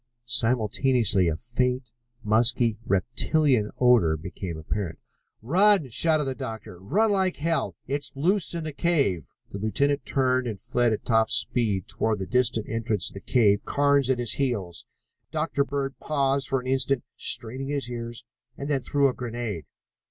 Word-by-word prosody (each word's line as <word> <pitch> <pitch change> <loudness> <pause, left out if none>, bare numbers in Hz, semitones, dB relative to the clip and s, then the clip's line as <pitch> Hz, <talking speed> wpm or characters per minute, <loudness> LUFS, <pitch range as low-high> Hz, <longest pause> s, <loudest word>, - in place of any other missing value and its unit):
Simultaneously 115 -3 +2
a 80 - 0
faint, 125 - -2 0.3
musky, 115 +1 +2
reptilian 120 - +1
odor 115 -11 +4
became 85 +1 -6
apparent. 85 +2 -4 0.5
"Run!" 185 - +3
shouted 155 +5 +3
the 135 -1 -2
doctor. 110 -9 -7
"Run 205 - +1
like 190 -2 +1
hell! 165 +2 -1
It's 140 +2 -3
loose 175 +5 +1
in 165 - -3
the 155 -1 -5
cave!" 140 - +1 0.3
The 100 - -6
lieutenant 140 +7 0
turned 130 -2 +1
and 105 -4 -5
fled 120 +4 +1
at 110 - -3
top 110 -1 +3
speed 105 -7 0
toward 110 -1 -1
the 95 - -4
distant 120 -1 +2
entrance 115 -4 0
to - - -17
the 100 - -7
cave, 105 -3 +2
Carnes 140 -2 +2
at 130 - +2
his 120 -2 +1
heels. 105 - -2 0.4
Dr. 155 -2 0
Bird 140 -1 -4
paused 140 -2 0
for 135 - +1
an 125 - -10
instant, 135 0 +1
straining 130 +4 0
his 140 -3 -2
ears, 120 -1 -6 0.3
and 140 +2 -4
then 135 -2 +1
threw 140 +3 +2
a 130 - -1
grenade. 115 - -5
125 Hz, 160 wpm, -25 LUFS, 110-140 Hz, 0.5 s, odor